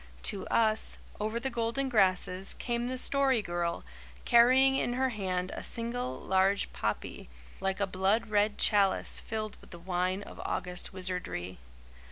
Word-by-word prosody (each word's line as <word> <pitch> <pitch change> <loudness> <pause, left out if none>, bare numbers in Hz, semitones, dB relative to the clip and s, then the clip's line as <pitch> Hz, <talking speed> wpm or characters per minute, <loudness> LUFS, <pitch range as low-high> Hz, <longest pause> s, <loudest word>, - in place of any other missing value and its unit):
To 195 - +1
us, 220 -1 +2 0.2
over 215 +2 -2
the 265 +2 -3
golden 235 +3 -1
grasses, 190 -4 +2
came 240 -1 -2
the 255 +1 -3
Story 265 -3 +2
Girl, 175 -1 -2 0.4
carrying 255 +3 +5
in 245 - 0
her 260 +1 +1
hand 185 -5 -2
a - - -6
single 230 - -1
large 190 +1 +1
poppy, 105 - -4 0.3
like 190 0 -2
a 200 - +2
blood 195 +4 0
red 205 0 +2
chalice 200 -3 +2
filled 215 -2 -4
with - - -17
the 175 - -10
wine 185 +2 -2
of - - -10
August 180 -1 -2
wizardry. 180 - -4
205 Hz, 150 wpm, -30 LUFS, 185-235 Hz, 0.4 s, carrying